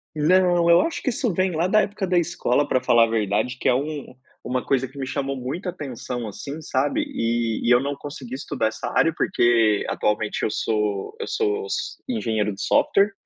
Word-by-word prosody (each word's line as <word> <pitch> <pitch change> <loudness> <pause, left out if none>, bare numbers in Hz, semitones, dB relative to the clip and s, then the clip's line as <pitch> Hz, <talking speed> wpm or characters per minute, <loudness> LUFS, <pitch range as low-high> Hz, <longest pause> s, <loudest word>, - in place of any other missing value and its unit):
Não, 175 +2 +3
eu 170 0 +7
acho 330 - -2
que 265 - 0
isso 235 -3 -1
vem 185 0 0
lá 170 +3 +1
da 215 +3 +4
época 205 -1 -2
da 180 -1 +1
escola, 145 -5 0
pra 130 - +1
falar 115 -1 +5
a 115 - -5
verdade, 110 +3 0
que - - -1
é - - +4
um 145 +1 -3 0.3
uma 125 0 -2
coisa 135 -1 +1
que 135 - -17
me 135 - -3
chamou 135 0 -2
muita 145 +10 -4
atenção, 125 -7 -5
assim, 140 +9 -7
sabe? 140 +1 0
E 115 -1 -1
e - - +2
eu 120 - +7
não 140 +1 -2
consegui 140 -3 -8
estudar 135 -3 -2
essa 110 0 -4
área 165 -1 +3
porque 115 - +2
atualmente 105 0 -1
eu - - +2
sou 105 - -1
eu 450 - -4
sou 430 -1 -1
s 430 - -3
engenheiro 110 - -1
de 95 - -8
software. 200 +2 +3
135 Hz, 205 wpm, -23 LUFS, 115-175 Hz, 0.3 s, eu